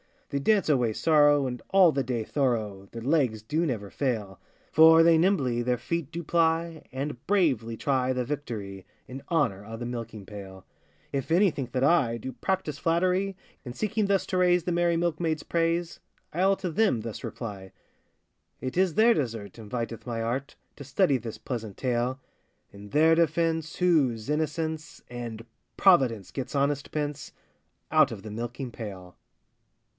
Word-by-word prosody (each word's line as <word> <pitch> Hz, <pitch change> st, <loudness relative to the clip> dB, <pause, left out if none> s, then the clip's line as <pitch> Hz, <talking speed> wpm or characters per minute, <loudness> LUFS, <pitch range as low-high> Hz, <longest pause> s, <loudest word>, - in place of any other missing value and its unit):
They 140 Hz, -, -1 dB
dance 205 Hz, +8 st, +2 dB
away 125 Hz, -6 st, +2 dB
sorrow, 145 Hz, 0 st, +4 dB
and 125 Hz, -1 st, -4 dB
all 190 Hz, -3 st, +6 dB
the 140 Hz, -2 st, -1 dB
day 120 Hz, -2 st, -2 dB
thorough 110 Hz, -7 st, -1 dB
Their 115 Hz, -, -7 dB
legs 130 Hz, -7 st, +1 dB
do 155 Hz, +9 st, 0 dB
never 105 Hz, -7 st, -4 dB
fail, 110 Hz, -9 st, -2 dB, 0.3 s
For 160 Hz, +1 st, +7 dB
they 165 Hz, -1 st, +6 dB
nimbly 145 Hz, -10 st, +2 dB
their 125 Hz, +1 st, 0 dB
feet 165 Hz, +4 st, -3 dB
do 170 Hz, +1 st, -5 dB
ply, 165 Hz, 0 st, +1 dB
And 135 Hz, -1 st, -5 dB
bravely 135 Hz, -, +1 dB
try 130 Hz, -1 st, +1 dB
the 125 Hz, -1 st, -2 dB
victory, 110 Hz, -9 st, -5 dB, 0.2 s
In 130 Hz, +2 st, -8 dB
honour 140 Hz, -, +1 dB
o' 110 Hz, +1 st, -7 dB
the 120 Hz, -, -5 dB
milking 115 Hz, -4 st, -6 dB
pail. 95 Hz, -2 st, -10 dB, 0.5 s
If 135 Hz, +1 st, -3 dB
any 185 Hz, +3 st, +5 dB
think 130 Hz, -5 st, -6 dB
that 130 Hz, -, 0 dB
I 140 Hz, -7 st, +3 dB
Do 130 Hz, +3 st, -6 dB
practise 150 Hz, +3 st, -2 dB
flattery, 185 Hz, +3 st, +1 dB, 0.3 s
In 120 Hz, -, -6 dB
seeking 215 Hz, -, -1 dB
thus 195 Hz, -1 st, +1 dB
to 185 Hz, -, -1 dB
raise 180 Hz, -1 st, +3 dB
the 180 Hz, -, -2 dB
merry 170 Hz, 0 st, +2 dB
milkmaids' 165 Hz, -2 st, -1 dB
praise, 170 Hz, 0 st, -1 dB, 0.3 s
I'll 190 Hz, +4 st, +3 dB
to 185 Hz, -3 st, -4 dB
them 160 Hz, -, +2 dB
thus 115 Hz, -1 st, -7 dB
reply:— 100 Hz, -5 st, -7 dB, 0.9 s
It 130 Hz, +5 st, -5 dB
is 185 Hz, -3 st, +2 dB
their 230 Hz, +2 st, +6 dB
desert 115 Hz, -, -4 dB
inviteth 115 Hz, +2 st, -5 dB
my 115 Hz, -1 st, -2 dB
art, 130 Hz, +5 st, -3 dB, 0.2 s
To 140 Hz, -, -8 dB
study 140 Hz, +2 st, +2 dB
this 115 Hz, -2 st, -7 dB
pleasant 110 Hz, -3 st, -5 dB
tale; 125 Hz, +1 st, -1 dB, 0.5 s
In 100 Hz, +1 st, -12 dB
their 160 Hz, +6 st, +4 dB
defence, 165 Hz, -1 st, +1 dB
whose 140 Hz, -10 st, +2 dB
innocence, 155 Hz, +1 st, -3 dB
And 115 Hz, -2 st, -6 dB, 0.3 s
providence, 130 Hz, -, +4 dB
gets 135 Hz, +1 st, -5 dB
honest 140 Hz, 0 st, 0 dB
pence 145 Hz, -1 st, -4 dB, 0.6 s
Out -, -, +5 dB
of 105 Hz, -4 st, -7 dB
the 110 Hz, -, -7 dB
milking 120 Hz, +3 st, -5 dB
pail. 95 Hz, -6 st, -9 dB
140 Hz, 160 wpm, -27 LUFS, 115-165 Hz, 0.9 s, For